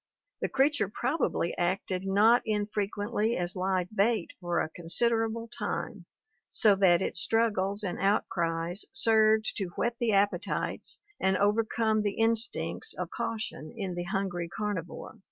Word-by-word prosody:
The - - 0
creature 275 -6 +2
probably 245 - -1
acted 185 +1 -1
not 215 +5 +5
in 210 -2 0
frequently 210 +2 -1
as 175 +1 -2
live 185 +1 -1
bait 210 -2 +1
for 175 -1 0
a - - 0
considerable 225 +7 0
time, 230 - -4 0.4
so 215 -4 +4
that 185 -2 +4
its - - -2
struggles 205 -1 +1
and 180 -3 -3
outcries 175 -3 0
served 220 -3 +3
to 195 - 0
whet 235 0 -1
the 235 -2 +1
appetites 200 +1 0 0.2
and 190 0 +2
overcome 220 +1 +2
the 205 -1 -2
instincts 230 - 0
of - - -5
caution 185 -9 -4
in 195 -4 -3
the 175 0 -4
hungry 185 -3 -2
carnivore. 205 +1 -5
205 Hz, 135 wpm, -29 LUFS, 185-225 Hz, 0.4 s, not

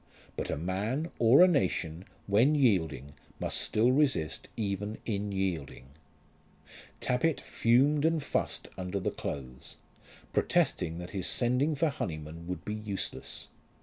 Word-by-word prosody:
But - - -4
a - - -1
man, 105 - -2
or 120 +9 +7
a - - +8
nation, 90 - 0 0.2
when 115 +9 +4
yielding 85 - +1 0.3
must - - +1
still 115 +4 +3
resist 130 - +1
even 105 0 -2
in 105 -2 -2
yielding. 85 -9 -3 1.1
Tappitt 140 +5 +1
fumed 140 +6 +3
and 165 +1 +3
fussed - - -2
under 90 +2 -2
the 95 - -1
clothes, 65 -3 -6 0.6
protesting 80 0 +1
that 90 0 -7
his 95 -3 -2
sending 125 +5 +1
for 155 +3 +2
Honyman 85 - -5
would 90 0 -5
be 105 - -3
useless. 105 -2 -5
105 Hz, 130 wpm, -30 LUFS, 85-130 Hz, 1.1 s, a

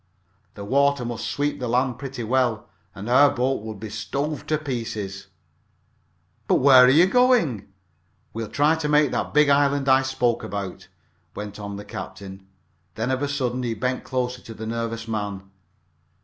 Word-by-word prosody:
The 100 - -7
water 140 +2 +2
must 120 -1 -4
sweep 145 0 -2
the 125 - -3
land 125 +1 0
pretty 135 -3 -6
well, 120 -2 0 0.3
and 100 +2 -7
our 140 +4 +6
boat 130 -1 -1
would 110 -2 -7
be 110 0 -7
stove 140 +9 -4
to 155 - +1
pieces." 110 -9 -5 1.2
"But - - +3
where 130 -2 +7
are - - +5
you 155 +7 +6
going?" 235 - +2 0.7
"We'll 115 -1 -5
try 150 +2 +3
to 160 -2 -2
make 150 -2 +4
that - - -2
big 150 -1 +4
island 140 0 +2
I 130 0 +5
spoke 125 -3 0
about," 95 -2 -6 0.5
went 105 0 -7
on 100 -1 -6
the 100 +1 -8
captain. 95 -1 -9 0.5
Then 115 +4 -2
of 130 +1 -1
a 145 - 0
sudden, 130 -3 -2
he 120 -2 -2
bent 125 +4 -2
closer 125 -1 -3
to 115 - -11
the 110 - -7
nervous 115 0 -4
man. 105 -3 -3
125 Hz, 170 wpm, -23 LUFS, 110-140 Hz, 1.2 s, where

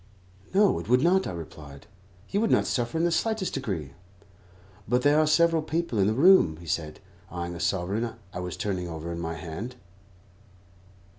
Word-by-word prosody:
"No, 200 0 +3
it - - -8
would 125 +2 +4
not," 190 +3 +3
I - - -3
replied. 75 -4 -10 0.5
"You 200 - +1
would 225 - +1
not - - +3
suffer 120 +3 -1
in 165 - +1
the 175 - +2
slightest 215 +3 0
degree." 80 -10 -4 1.0
"But 125 0 +2
there 145 +1 +5
are 155 - +3
several 165 +1 +4
people 155 -7 -2
in 95 - +4
the 110 - +1
room," 140 - +5
he 85 - -12
said, 80 -2 -3 0.3
eyeing 85 0 -5
a 85 - -7
sovereign 95 +6 -1 0.2
I - - -5
was 90 -1 -5
turning 95 -4 -2
over 85 0 -6
in 85 - -5
my 85 -1 -3
hand. 95 +9 -6
105 Hz, 180 wpm, -27 LUFS, -, 1.0 s, there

